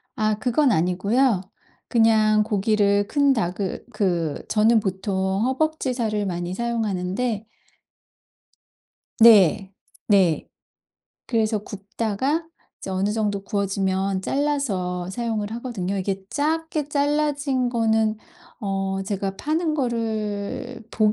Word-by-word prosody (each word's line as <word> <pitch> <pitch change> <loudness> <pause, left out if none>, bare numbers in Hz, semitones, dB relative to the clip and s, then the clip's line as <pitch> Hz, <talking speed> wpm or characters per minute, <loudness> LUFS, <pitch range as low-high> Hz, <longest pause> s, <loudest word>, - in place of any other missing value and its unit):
아 215 -1 +1
그건 250 +3 +2
아니고요. 195 +6 +2 0.5
그냥 215 -2 +4
고기를 205 -1 +2
큰 280 0 +3
닭을 190 -3 -3
그 170 -7 -1
저는 220 +1 +4
보통 190 0 -1
허벅지 270 0 0
살을 215 -4 -1
많이 175 -1 -3
사용하는데 220 0 -2 1.7
네. 200 -4 +6 0.3
네. 190 -6 +3 0.8
그래서 220 -2 +1
굽다가 215 - -2 0.3
이제 195 - -7
어느 190 +2 0
정도 205 -3 -1
구워지면 195 -2 -1
잘라서 195 -12 -1
사용을 220 -2 -2
하거든요. 225 -6 -3
이게 190 0 -3
작게 310 0 -1
잘라진 285 -3 0
거는 220 -2 +1 0.4
어 195 -1 -2
제가 195 -1 -3
파는 315 +1 -1
거를 230 -2 -3
복 215 -1 +2
215 Hz, 220 characters per minute, -23 LUFS, 195-245 Hz, 1.7 s, 네